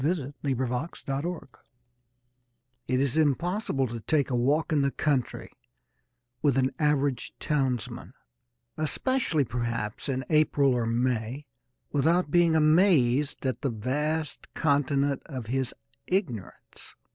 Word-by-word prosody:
L._ - - -4
I 145 -3 -1
THE 135 -2 0
PLEASURES 125 +5 -3
OF 135 0 0
IGNORANCE 155 -7 -5 1.3
It 130 0 +1
is 140 +1 0
impossible 160 - +1
to 120 -1 -5
take 145 +4 0
a - - +1
walk 145 +7 +1
in 145 - +3
the 140 - +2
country 140 -3 -1 0.9
with 140 -3 +2
an 130 0 +2
average 145 -4 0
townsman 135 -5 -2 0.6
especially, 160 - +1
perhaps, 120 0 -3
in 130 -1 -2
April 145 -3 +3
or 120 -2 0
May 120 +3 -1 0.5
without 160 +3 +2
being 170 -1 +4
amazed 150 -5 +3
at 130 -2 -1
the 140 - 0
vast 145 +7 -2
continent 140 -2 +1
of 130 -6 -6
his 130 +2 -1 0.4
ignorance. 160 - -4
140 Hz, 125 wpm, -27 LUFS, 125-155 Hz, 1.3 s, being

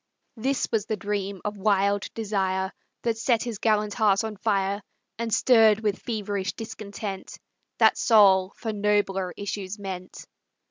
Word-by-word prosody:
This 260 +3 -1
was 220 -2 0
the 215 - -1
dream 200 -1 -3
of 210 0 -3
wild 200 0 +1
desire 190 -3 -1 0.3
That 230 -1 -1
set 230 -1 +2
his 235 -4 -5
gallant 210 -2 +1
heart 205 -3 +3
on 220 -1 -4
fire, 200 -1 0 0.4
And 230 -1 -2
stirred 220 -3 +5
with 210 -2 -1
feverish 205 -4 -3
discontent 205 -3 -7 0.4
That - - +4
soul 195 -4 +5
for 220 -2 -4
nobler 205 -3 0
issues 200 0 -4
meant. 185 -2 -7
205 Hz, 140 wpm, -26 LUFS, 195-220 Hz, 0.4 s, stirred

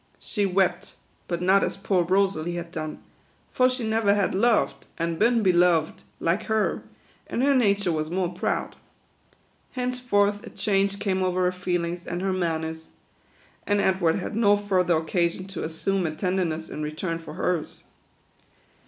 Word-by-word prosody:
She 205 -3 -1
wept, 185 -1 0 0.3
but 175 0 -2
not 190 +2 +4
as - - -2
poor 195 -2 +1
Rosalie 180 -2 +1
had 170 -1 -6
done; 155 -2 -6 0.5
for 255 0 +3
she 250 -3 -3
never 220 -2 +2
had 200 -2 +1
loved, 225 +4 +1
a'nd 165 0 -1
been 230 0 +3
beloved, 175 -4 +3 0.2
like 170 +4 0
her, 220 -1 0 0.5
and 245 - -1
her 280 +1 +4
nature 200 -7 +2
was 155 -1 -2
more 180 0 -1
proud. 175 - -2 1.0
Henceforth 245 -5 0
a - - -9
change 200 -1 0
came 190 -2 -1
over 185 0 +1
her 180 - +2
feelings 175 -1 -2
and 175 +2 -3
her 195 -1 0
manners; 160 -3 -2 0.8
and 205 0 +2
Edward 190 -4 +2
had 190 - -4
no 205 -2 +4
fur 200 -3 +1
ther 175 -2 +2
occasion 170 +3 -1
to 195 - -5
assume 180 +3 -1
a 155 - -4
tenderness 175 -3 -1
in 155 - -6
return 160 +3 -3
for 165 - -10
hers. 175 -4 -2
185 Hz, 160 wpm, -25 LUFS, 170-205 Hz, 1.0 s, not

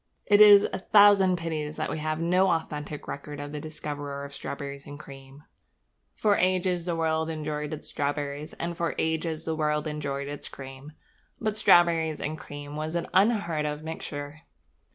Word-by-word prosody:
It 205 0 +5
is 205 -1 +10
a - - -2
thousand 200 -2 +6
pities 155 -3 -3
that 155 - -3
we - - -3
have 155 0 -2
no 180 +3 +3
authentic 150 -3 -3
record 145 +1 -6
of 145 0 -6
the 150 - -4
discoverer 145 -2 -5
of 140 - -10
strawberries 140 0 -6
and 145 +1 -9
cream. 135 -1 -12 0.7
For 210 -2 +2
ages 180 -1 +1
the 170 - 0
world 160 0 0
enjoyed 150 -1 -3
its 155 - -7
strawberries, 145 +1 -3
and 170 0 -4
for 170 -1 -2
ages 160 0 -1
the 160 - -1
world 150 -1 0
enjoyed 140 -2 -3
its 145 0 -6
cream. 135 +2 -10 0.5
But 215 -2 -1
strawberries 165 -5 +4
and 155 - -3
cream 145 -1 -8
was 155 +2 -4
an 170 - -2
unheard 185 -7 +2
of 150 +1 -4
mixture. 150 -2 -6
155 Hz, 170 wpm, -27 LUFS, 145-170 Hz, 0.7 s, is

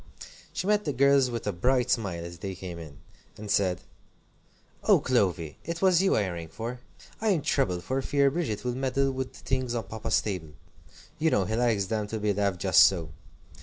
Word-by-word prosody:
She - - -4
met 210 +1 +2
the 145 - -1
girls 140 0 +4
with 120 -2 -4
a 105 - 0
bright 125 +7 +1
smile 90 -7 -1
as 85 0 -9
they 95 0 -5
came 90 -2 -7
in, 75 -4 -10 0.4
and 105 -1 -6
said: 95 -3 +1 1.0
"Oh, - - +6
Clovy, 90 - 0
it 170 +1 -4
was 185 -2 +4
you 195 - +3
I 100 - +1
rang 85 -2 -5
for! 115 +9 -6 0.4
I 220 - 0
am 180 -9 +2
troubled 95 -12 0
for 135 +1 -1
fear 140 0 +2
Bridget 135 -10 -2
will 125 - 0
meddle 135 +1 0
with 130 0 -4
the - - -13
things 130 -2 -1
on 115 - -1
Papa's 110 0 -1
table. 90 -7 -5 0.7
You 160 +1 +3
know 100 -10 +2
he 110 - -2
likes 115 -4 +1
them 105 +1 -2
to 110 +1 -4
be 105 -1 +1
left 100 -3 0
just - - +4
so. 85 -4 +4
110 Hz, 205 wpm, -27 LUFS, 95-135 Hz, 1.0 s, Oh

